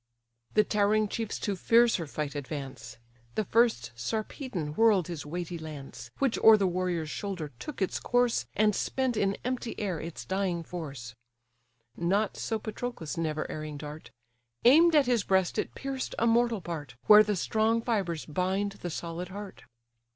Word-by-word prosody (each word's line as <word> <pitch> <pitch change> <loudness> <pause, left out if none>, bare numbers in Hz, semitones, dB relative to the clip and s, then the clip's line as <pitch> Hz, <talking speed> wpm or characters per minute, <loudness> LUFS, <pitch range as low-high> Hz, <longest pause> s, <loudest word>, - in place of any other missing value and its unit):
The 215 - +6
towering 210 0 +2
chiefs 225 -1 -3
to 205 - -1
fiercer 230 -4 +3
fight 145 0 -4
advance: 135 -5 -6 0.4
And 215 - 0
first 225 - +2
Sarpedon 190 - -4
whirl'd 210 -2 +4
his 160 -4 -6
weighty 175 +1 -4
lance, 140 -6 -8
Which 270 -4 +1
o'er 220 -1 +8
the 200 - +1
warrior's 175 -4 -1
shoulder 180 -7 -4
took 290 -10 -3
its 190 - -2
course, 245 -1 +1
And 210 0 +3
spent 260 -2 -1
in 200 -2 +1
empty 250 -2 -3
air 190 -6 -2
its 165 +1 -7
dying 190 -3 -1
force. 140 -10 -7 0.8
Not 195 +5 +1
so 225 - -2
Patroclus' 215 -6 -5
never 155 -2 -2
erring 155 -1 -5
dart; 150 +1 -8 0.6
Aim'd 320 +6 +7
at 290 -2 +6
his 240 -4 +2
breast 190 -2 +1
it - - -3
pierced 270 -1 -4
a 230 - +2
mortal 235 -2 +3
part, 150 -8 -6
Where 210 0 +9
the 210 -1 +1
strong 220 +4 +1
fibres 190 -9 -1
bind 190 +5 -1
the 175 - -3
solid 170 +2 -5
heart. 200 0 -9
190 Hz, 160 wpm, -29 LUFS, 160-225 Hz, 0.8 s, Where